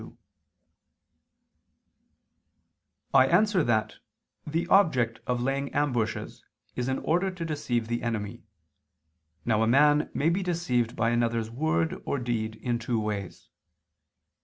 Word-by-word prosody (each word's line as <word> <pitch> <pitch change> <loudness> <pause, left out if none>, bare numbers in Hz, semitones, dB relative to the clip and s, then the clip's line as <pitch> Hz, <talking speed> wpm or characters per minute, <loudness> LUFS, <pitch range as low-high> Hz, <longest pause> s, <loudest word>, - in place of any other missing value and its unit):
I 130 -1 +6
answer 190 +2 +3
that, 110 -4 0 0.5
The 165 +3 -1
object 130 - +3
of 125 -1 0
laying 135 +1 -1
ambushes 125 -7 -1 0.3
is 125 0 -2
in 130 0 0
order 180 +4 0
to 180 -3 -6
deceive 130 -7 -2
the 120 +1 -2
enemy. 115 0 -3 1.0
Now 110 -2 +2
a 110 - +2
man 150 +4 +4
may 155 - +2
be 180 +4 0
deceived 165 -10 -1
by 115 +1 +1
another's 115 -1 0
word 160 +5 -1
or - - -2
deed 115 -3 -2
in 120 +1 -2
two 115 0 -1
ways. 105 -3 -5
125 Hz, 120 wpm, -27 LUFS, 115-155 Hz, 1.0 s, I